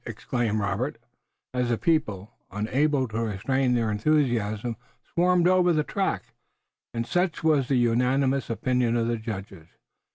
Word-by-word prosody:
exclaimed 115 -3 -2
Robert, 110 +6 -2 0.6
as 125 -1 0
the 120 - +1
people, 110 - 0 0.2
unable 130 +7 +1
to 110 0 -3
restrain 125 +5 0
their 115 -2 +1
enthusiasm, 115 -3 0 0.4
swarmed 180 0 +3
over 180 -1 +4
the 155 -1 +2
track, 195 +4 -2 0.6
and 115 0 -3
such 175 +3 -1
was 150 -5 +3
the 135 - +1
unanimous 125 +3 +2
opinion 120 0 +1
of 115 - +1
the 120 0 0
judges. 100 -7 -7
125 Hz, 135 wpm, -26 LUFS, 110-145 Hz, 0.6 s, over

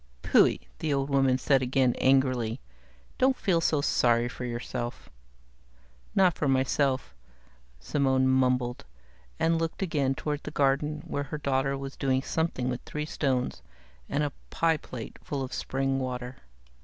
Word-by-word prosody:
"Phui," - - +4 0.2
the 155 - -1
old 140 0 0
woman 135 -2 +3
said 135 0 +3
again, 130 -1 +2
angrily. 130 -3 +2 0.6
"Don't 260 0 +3
feel 175 -5 +1
so 155 -3 +2
sorry 120 -3 +3
for 125 0 -6
yourself." 120 0 -5 1.0
"Not 185 -3 +5
for 145 - -2
myself," 135 0 +1 0.7
Simone 130 - +1
mumbled, 125 -1 +1 0.6
and 165 0 +2
looked 165 +3 -2
again 140 -6 0
toward 150 +1 -3
the - - -6
garden 150 +2 +1
where 145 0 -3
her 150 +2 -5
daughter 135 -1 0
was 135 0 -6
doing 130 -1 +1
something 160 -7 -1
with 125 -1 -2
three 150 0 -4
stones 130 -5 -1 0.5
and 145 +2 0
a 145 - -1 0.2
pie 165 -1 +2
plate 125 -5 -9
full 140 -2 -3
of 130 - -6
spring 135 0 -1
water. 125 -1 -4
135 Hz, 145 wpm, -28 LUFS, 130-150 Hz, 1.0 s, Not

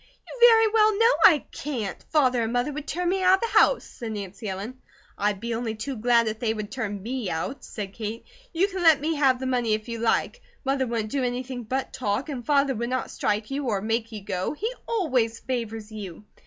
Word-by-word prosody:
"You - - -9
very 450 -1 +6
well 430 -1 +4
know 460 +3 +5
I 310 -7 +3
can't! 235 -10 -4
Father 255 -6 +3
and 225 0 -1
Mother 245 +4 0
would 300 +1 -6
turn 355 +1 -2
me 380 +1 0
out 370 0 +6
of 385 - -8
the 465 - +4
house," - - +4
said 225 -2 -7
Nancy 205 +1 -6
Ellen. 210 +7 -6 0.3
"I'd 205 -1 0
be 235 +2 -3
only 225 -1 -2
too 265 +5 -4
glad 235 0 +3
if 220 0 -3
they 225 -2 0
would 215 -1 -5
turn 205 -7 -4
me 240 -3 -3
out," 165 +12 -4
said 200 -3 -6
Kate. 220 +1 -5 0.3
"You 360 +3 +2
can 380 -2 -5
let 320 -4 +6
me 310 +3 -1
have 265 -3 +3
the 260 - -4
money 245 -4 +1
if 215 +1 -7
you 230 -1 -4
like. 235 - 0 0.2
Mother 265 -1 +1
wouldn't 225 -2 -2
do 275 -2 0
anything 250 0 -3
but 260 +4 -3
talk; 250 +4 -2
and 260 -4 -4
Father 280 0 +2
would 235 0 -3
not 255 -1 -2
strike 210 +3 -1
you, 280 +1 -2
or 210 -4 +1
make 225 +3 -1
you 210 -3 -7
go, 185 +2 -2
he 440 +10 -3
always 255 - +1
favours 225 -4 -4
you." 205 -4 -8
245 Hz, 225 wpm, -25 LUFS, 220-285 Hz, 0.3 s, very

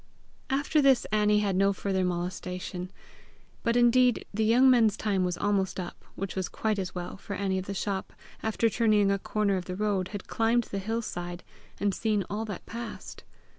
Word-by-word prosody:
After 285 +3 +2
this 270 -3 +4
Annie 210 0 +3
had 200 -3 0
no 195 +1 +3
further 190 -1 -1
molestation. 180 0 -3 0.7
But 230 -1 +1
indeed 245 0 +4
the 220 +2 +1
young 240 +4 +5
men's 230 -5 +5
time 200 -4 0
was 180 -1 -1
almost 195 -2 0
up 175 -1 -7
which 195 -1 -4
was 190 -1 -2
quite 215 -2 -1
as 185 -2 -4
well, 180 +1 -5
for 200 +1 -6
Annie 190 -1 0
of 185 - -7
the 200 - -4
shop, 195 0 -2 0.3
after 220 +1 +1
turning 215 -3 +3
a 195 - +1
corner 205 -1 0
of 180 - -4
the 180 - -4
road, 200 -2 0
had 200 0 -7
climbed 230 +1 +2
the 200 - -4
hill 225 +4 -2
side, 175 -3 -5 0.4
and 200 -1 +1
seen 210 -1 0
all 215 +2 -2
that 205 -4 -7
passed. 235 0 -7
200 Hz, 190 wpm, -28 LUFS, 190-225 Hz, 0.7 s, young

